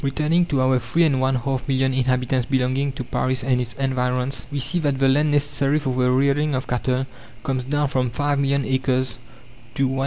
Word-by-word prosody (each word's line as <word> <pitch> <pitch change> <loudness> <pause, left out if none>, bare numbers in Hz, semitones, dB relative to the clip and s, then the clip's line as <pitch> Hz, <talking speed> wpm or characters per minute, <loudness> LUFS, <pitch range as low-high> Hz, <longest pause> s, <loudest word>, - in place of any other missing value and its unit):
Returning 155 +5 +1
to 140 -5 0
our 130 0 +3
three 125 +9 +1
and 140 -5 +2
one 130 0 +1
half 130 +2 -2
million 130 -1 +1
inhabitants 125 -1 0
belonging 130 +1 0
to 130 - -5
Paris 130 +1 -1
and 125 -1 +1
its 120 -2 -4
environs, 125 -1 -1
we 145 - -3
see 140 +6 0
that 145 -4 0
the 135 0 +3
land 145 +3 +3
necessary 145 0 +1
for 140 -4 -2
the 125 0 +1
rearing 140 +3 +2
of 130 +1 -2
cattle 125 +1 -1 0.4
comes 130 -2 -2
down 145 +2 0
from 130 -2 0
five 145 +4 -1
million 140 0 +1
acres 130 -1 -1 0.6
to 135 - 0
197,000. 130 0 -2
130 Hz, 205 wpm, -22 LUFS, 130-140 Hz, 0.6 s, our